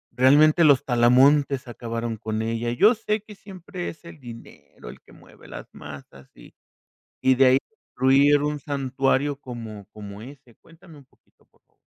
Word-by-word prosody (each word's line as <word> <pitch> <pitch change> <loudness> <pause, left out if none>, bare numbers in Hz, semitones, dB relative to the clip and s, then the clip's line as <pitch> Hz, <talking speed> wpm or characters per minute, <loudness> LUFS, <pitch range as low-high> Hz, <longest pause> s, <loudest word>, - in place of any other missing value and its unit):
¿realmente 150 +6 +4
los 140 -3 +4
talamontes 130 +3 +3
acabaron 115 -1 -5
con 110 0 -4
ella? 115 +1 -3
Yo 210 - +4
sé 215 -1 -3
que 215 - -13
siempre 185 -3 -8
es 165 - -13
el 170 -2 -13
dinero 120 -3 -13
el - - -13
que - - -22
mueve - - -19
las - - -9
masas 70 -2 -13
y - - -17 0.7
y 130 0 +3
de 135 - +4
ahí 130 +1 +5 0.4
incluir 140 +3 +3
un 150 0 -2
santuario 135 0 -1
como 115 -6 -9
como 105 -1 -10
ese, 130 -3 -15
cuéntame 165 -1 -18
un 140 - -18
poquito, - - -35
por - - -36
favor. - - -45
130 Hz, 165 wpm, -23 LUFS, 115-145 Hz, 0.7 s, ahí